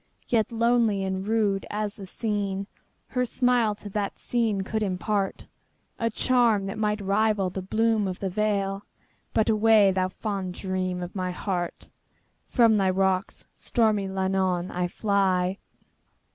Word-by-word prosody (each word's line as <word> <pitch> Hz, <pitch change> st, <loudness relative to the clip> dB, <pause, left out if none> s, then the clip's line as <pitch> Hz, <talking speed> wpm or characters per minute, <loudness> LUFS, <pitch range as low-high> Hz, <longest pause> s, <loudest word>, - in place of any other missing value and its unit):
Yet 230 Hz, -1 st, +1 dB
lonely 230 Hz, -3 st, +2 dB
and 190 Hz, +1 st, -3 dB
rude 210 Hz, -3 st, +1 dB
as 210 Hz, -1 st, -2 dB
the 195 Hz, -3 st, -10 dB
scene, 200 Hz, -2 st, -2 dB, 0.4 s
Her 250 Hz, -1 st, 0 dB
smile 245 Hz, -3 st, +2 dB
to 205 Hz, -, -9 dB
that 200 Hz, -1 st, -2 dB
scene 225 Hz, -5 st, 0 dB
could 220 Hz, +3 st, -2 dB
impartA 195 Hz, 0 st, -1 dB, 0.7 s
charm 235 Hz, -4 st, +2 dB
that 195 Hz, +2 st, -5 dB
might 210 Hz, 0 st, 0 dB
rival 200 Hz, -1 st, +1 dB
the 190 Hz, -, -4 dB
bloom 215 Hz, +2 st, +1 dB
of 185 Hz, -1 st, -4 dB
the 195 Hz, -, -2 dB
vale,—But 205 Hz, +1 st, -2 dB
away, 215 Hz, -2 st, +5 dB
thou 185 Hz, -1 st, +1 dB
fond 190 Hz, -2 st, -4 dB
dream 185 Hz, -2 st, -2 dB
of 175 Hz, -, -7 dB
my 185 Hz, -1 st, -2 dB
heart! 180 Hz, -1 st, -4 dB, 0.6 s
From 230 Hz, -4 st, +4 dB
thy 195 Hz, -2 st, +2 dB
rocks, 190 Hz, 0 st, 0 dB
stormy 215 Hz, -4 st, +1 dB
Llannon, 190 Hz, -2 st, 0 dB
I 180 Hz, 0 st, -1 dB
fly. 190 Hz, -1 st, +1 dB
200 Hz, 135 wpm, -26 LUFS, 190-220 Hz, 0.7 s, away